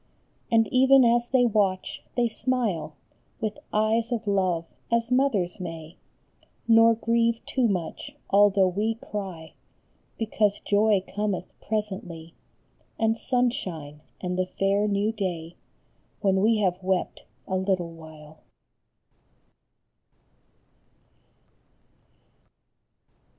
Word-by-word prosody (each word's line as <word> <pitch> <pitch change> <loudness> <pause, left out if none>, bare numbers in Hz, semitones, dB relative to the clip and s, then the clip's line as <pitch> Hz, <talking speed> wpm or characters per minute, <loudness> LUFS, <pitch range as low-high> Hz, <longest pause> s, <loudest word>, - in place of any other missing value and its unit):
And 225 -1 +4
even 265 0 +6
as 235 0 +3
they 255 -2 +4
watch, 200 -5 0 0.2
they 240 -1 +3
smile, 220 - -1 0.4
With 215 -1 -3
eyes 220 +2 +1
of 230 -2 -2
love, 185 -5 0 0.2
as 235 +1 +2
mothers 245 -10 +1
may, 165 -2 -7 0.7
Nor 225 0 +6
grieve 230 0 0
too 255 -3 +1
much 180 -6 -4 0.2
although 200 -1 +5
we 210 +5 -1
cry, 190 -7 -7 0.6
Because 215 -2 0
joy 205 -1 +3
cometh 205 -3 -3
presently, 190 -6 -4 0.6
And 225 0 +2
sunshine, 185 - -2 0.2
and 180 0 -3
the 185 - 0
fair 195 +2 0
new 205 +1 +1
day, 175 -6 -4 0.7
When 190 -2 +2
we 220 +2 +3
have 185 -2 0
wept 190 0 -2 0.2
a 190 - -2
little 185 -2 -1
while. 155 -1 -13
205 Hz, 100 wpm, -26 LUFS, 180-225 Hz, 0.7 s, even